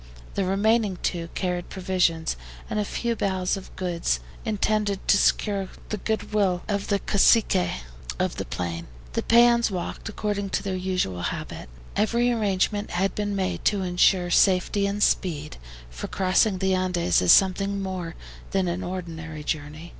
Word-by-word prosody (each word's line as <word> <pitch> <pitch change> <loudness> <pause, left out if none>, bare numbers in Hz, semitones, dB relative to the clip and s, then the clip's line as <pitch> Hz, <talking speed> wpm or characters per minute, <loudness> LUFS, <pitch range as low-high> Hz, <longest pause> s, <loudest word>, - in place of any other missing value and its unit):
The 195 - 0
remaining 205 +1 +2
two 170 -2 -2
carried 180 -2 -2
provisions 180 -4 0 0.4
and 210 - 0
a - - +1
few 235 +3 -2
bales 190 -3 0
of 195 - -10
goods, 175 -2 -1 0.2
intended 210 -2 0
to - - +6
secure 200 -1 +1 0.2
the 215 - -2
goodwill 205 -3 0
of 200 -1 -1
the 200 - +2
Caciques 195 - +3 0.3
of - - -1
the - - -3
plain. 85 -1 -4 0.3
The 230 - 0
PEONS 235 0 +5
walked, 185 +2 -5
according 205 -2 -2
to - - -6
their 195 -2 -2
usual 185 - -1
habit. 65 - -5 0.3
Every 235 +3 +2
arrangement 205 -2 0
had 190 +3 0
been 205 -1 -2
made 190 -1 -2
to 205 -2 +2
insure 180 0 +3
safety 195 +2 +3
and 205 +1 0
speed, 155 -4 0 0.3
for - - -6
crossing 190 +2 +2
the 190 0 +1
Andes 180 - +1
is 90 - +5
something 195 +1 +4
more 185 -4 -4 0.3
than 190 -2 0
an 175 +2 -2
ordinary 165 -4 -6
journey. 155 +2 -4
190 Hz, 155 wpm, -25 LUFS, 175-205 Hz, 0.4 s, to